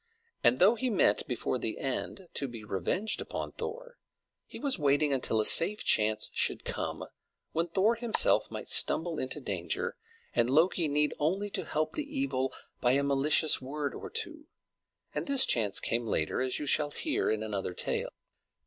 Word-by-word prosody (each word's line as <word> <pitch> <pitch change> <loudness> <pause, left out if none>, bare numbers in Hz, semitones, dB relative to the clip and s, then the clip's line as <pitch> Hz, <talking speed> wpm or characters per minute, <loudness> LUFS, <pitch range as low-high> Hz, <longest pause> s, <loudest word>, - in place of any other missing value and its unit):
And 120 - +4
though 195 - +5
he 255 +2 -2
meant, 205 -6 +2
before 125 -1 -2
the 110 - -3
end, 140 +7 -4
to 140 - -2
be 115 -3 -9
revenged 105 - -2
upon - - -6
Thor, - - -8 0.5
he - - -10
was 275 -9 -2
waiting 145 0 +2
until 125 -4 +1
a 105 - +1
safe 210 - +7
chance 110 0 +2
should - - +2
come, - - -4 0.5
when 165 +2 -1
Thor 195 +6 +2
himself 235 -1 +3
might - - -7
stumble 165 -1 +3
into 130 +3 -3
danger, 95 -10 -3 0.4
and 120 0 +1
Loki 165 +4 +3
need 150 +1 +1
only 190 +7 -1
to - - -3
help 155 +1 -2
the 305 - -1 0.2
evil 135 - -1 0.3
by 125 0 +2
a 140 +1 +2
malicious 140 +3 +2
word 140 +2 -4
or - - -8
two; 325 -9 -6 0.7
and - - -4
this 275 -1 +6
chance 105 -4 +1
came 115 0 -2
later, 80 +1 -1
as 130 -1 -1
you 150 - -5
shall 145 +1 +1
hear 300 - -2
in 110 0 -1
another 100 -4 -4
tale. - - -2
150 Hz, 175 wpm, -29 LUFS, 125-205 Hz, 0.7 s, safe